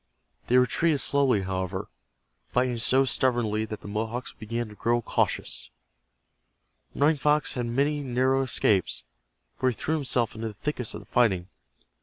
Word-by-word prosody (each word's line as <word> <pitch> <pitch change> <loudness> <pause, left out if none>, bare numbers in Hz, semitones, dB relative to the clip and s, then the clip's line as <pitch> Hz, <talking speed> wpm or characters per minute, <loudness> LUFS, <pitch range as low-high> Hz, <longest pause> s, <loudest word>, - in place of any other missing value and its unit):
They 125 - +4
retreated 145 +4 +3
slowly, 135 -9 +3
however, 95 0 -3 0.6
fighting 125 -1 0
so 130 +4 +4
stubbornly 120 -4 +1
that 110 -1 -7
the - - -10
Mohawks 110 +4 -3
began 115 +1 -4
to - - -11
grow 120 +3 +1
cautious. - - -1 1.3
Running 150 +2 +3
Fox 150 +1 +2
had 120 -2 -2
many 140 +5 0
narrow 130 0 +1
escapes, 105 - +1 0.5
for 130 - +1
he 125 - -3
threw 155 - -2
himself 125 -6 0
into 110 +1 -4
the 105 - -7
thickest 125 -1 -3
of - - -7
the - - -16
fighting. 95 -7 +1
120 Hz, 150 wpm, -27 LUFS, 110-135 Hz, 1.3 s, They